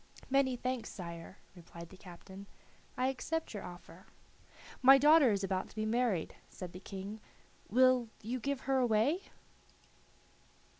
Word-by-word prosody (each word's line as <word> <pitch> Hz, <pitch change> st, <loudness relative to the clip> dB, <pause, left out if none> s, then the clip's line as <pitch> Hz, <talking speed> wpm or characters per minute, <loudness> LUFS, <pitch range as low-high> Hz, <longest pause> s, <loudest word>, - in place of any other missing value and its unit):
"Many 270 Hz, -2 st, +3 dB
thanks, 255 Hz, -1 st, -3 dB
sire," 170 Hz, 0 st, -8 dB, 0.2 s
replied 170 Hz, -1 st, -11 dB
the -, -, -13 dB
captain, 190 Hz, +2 st, -12 dB, 0.5 s
"I 255 Hz, -, +1 dB
accept 320 Hz, +4 st, -3 dB
your 205 Hz, -, -5 dB
offer." 175 Hz, +1 st, -12 dB, 0.7 s
"My 270 Hz, +1 st, +9 dB
daughter 295 Hz, -2 st, +6 dB
is 200 Hz, -1 st, -1 dB
about 190 Hz, -1 st, -2 dB
to -, -, -18 dB
be 215 Hz, 0 st, -2 dB
married," 220 Hz, -6 st, 0 dB, 0.2 s
said 180 Hz, -2 st, -8 dB
the 180 Hz, -, -9 dB
King; 200 Hz, +2 st, -7 dB, 0.5 s
"will 255 Hz, 0 st, +4 dB
you 245 Hz, +4 st, -3 dB
give 280 Hz, +1 st, -2 dB
her 270 Hz, -1 st, +1 dB
away?" 245 Hz, -, +2 dB
220 Hz, 140 wpm, -33 LUFS, 190-260 Hz, 0.7 s, My